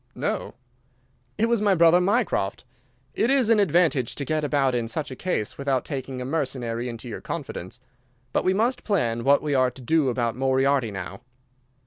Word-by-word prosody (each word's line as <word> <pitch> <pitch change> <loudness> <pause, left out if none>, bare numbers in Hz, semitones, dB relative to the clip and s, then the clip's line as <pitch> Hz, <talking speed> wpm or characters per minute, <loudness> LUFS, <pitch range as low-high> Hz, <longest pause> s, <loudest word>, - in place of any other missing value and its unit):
"No." - - -3 0.8
"It 220 - +2
was 230 -2 +1
my 205 -2 +3
brother 170 +1 +5
Mycroft. 185 - 0 0.5
It 230 - +1
is 265 -4 +3
an 220 - +5
advantage 165 - +2
to 140 - -4
get 155 +1 -1
about 140 -3 +1
in 120 -2 -1
such 140 +5 -3
a - - -5
case 135 - -3
without 135 -2 0
taking 135 -3 -5
a 125 - -4
mercenary 125 -5 -2
into 115 +1 -7
your 115 - -6
confidence. 95 +8 -6 0.5
But - - +1
we 185 +1 +2
must 240 +5 0
plan 120 - 0
what 140 +2 +4
we 150 -2 -1
are 130 -2 +3
to 130 +1 -13
do 155 +1 +2
about 120 -2 -1
Moriarty 135 -1 +2
now." 95 -1 -7
140 Hz, 180 wpm, -25 LUFS, 125-175 Hz, 0.8 s, brother